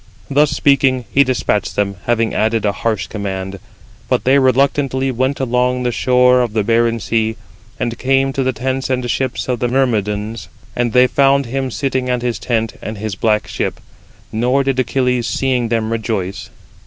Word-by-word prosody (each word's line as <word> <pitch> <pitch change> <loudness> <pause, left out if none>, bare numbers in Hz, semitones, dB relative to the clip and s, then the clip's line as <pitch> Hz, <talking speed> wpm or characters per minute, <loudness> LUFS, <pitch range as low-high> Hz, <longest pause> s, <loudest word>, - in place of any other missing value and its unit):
Thus 145 +2 +4
speaking, 140 -3 +2
he 140 - +5
despatched 125 -5 -1
them, 100 -1 -1
having 115 -1 +1
added 110 0 +1
42 - - +1
a - - +2
harsh 110 +1 -2
command. 95 -2 -5 0.5
But - - +1
they 135 +2 +4
reluctantly 135 0 +2
went 130 +3 -1
along 125 0 0
the 125 - 0
shore 125 +1 +3
of 120 -3 -2
the 110 -2 +1
barren 115 +1 +2
sea, 110 0 0 0.4
and 120 -1 -2
came 135 +1 +2
to 135 - -1
the 130 0 +1
tents 130 +2 -3
and 125 -1 -1
ships 130 -2 -2
of 125 -2 -1
the 120 - 0
Myrmidons. 110 -4 -1 0.3
And 120 -2 0
they 125 0 +6
found 140 +1 +3
him 130 +2 -2
sitting 130 0 -2
at 125 -1 -1
his 120 -5 -1
tent 115 -1 -2
and 110 0 -6
his 110 0 -4
black 105 +2 0
ship: - - -3 0.5
nor 125 +5 +1
did 135 -1 0
Achilles, 125 -1 0
seeing 130 -3 0
them, 115 -1 -1
rejoice. 105 -4 -3
125 Hz, 180 wpm, -17 LUFS, 110-130 Hz, 0.5 s, they